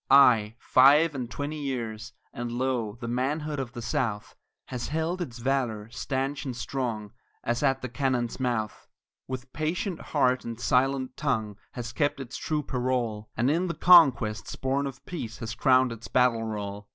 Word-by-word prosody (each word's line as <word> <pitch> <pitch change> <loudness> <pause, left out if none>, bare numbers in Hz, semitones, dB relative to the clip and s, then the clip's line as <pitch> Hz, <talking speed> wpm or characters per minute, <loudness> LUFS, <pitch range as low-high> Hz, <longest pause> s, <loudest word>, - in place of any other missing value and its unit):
Aye, 115 -6 +6
five 145 +6 +5
and 125 -4 -4
twenty 145 +4 -4
years, 115 -4 -4 0.2
and 120 0 -4
lo, 120 -3 -1
the 120 - -5
manhood 145 +5 -1
of 130 -2 -4
the 120 - -6
South 115 -3 -2 0.3
Has 125 -2 -4
held 160 +4 -1
its 130 -8 -5
valor 120 -4 -1
stanch 135 +2 -2
and 130 -5 -5
strong 115 -7 -3 0.3
as 120 0 -1
at 135 -3 +1
the - - -1
cannon's 125 -1 -1
mouth, 120 -4 -2 0.4
With 130 0 -6
patient 165 +4 -2
heart 130 -4 +1
and 115 0 -6
silent 130 +1 +1
tongue 110 -8 -1 0.2
has 120 -1 -6
kept 145 +2 0
its 130 -1 -6
true 155 -1 -1
parole, 125 -5 -2
And 120 +5 +3
in 175 +4 +1
the 170 - -3
conquests 135 -12 +5
born 135 +1 0
of 135 -1 -9
peace 120 -11 -6
has 115 -1 -5
crowned 130 -2 +4
its 115 0 -8
battle 125 -3 +2
roll. 105 -2 -5
125 Hz, 165 wpm, -27 LUFS, 115-140 Hz, 0.4 s, Aye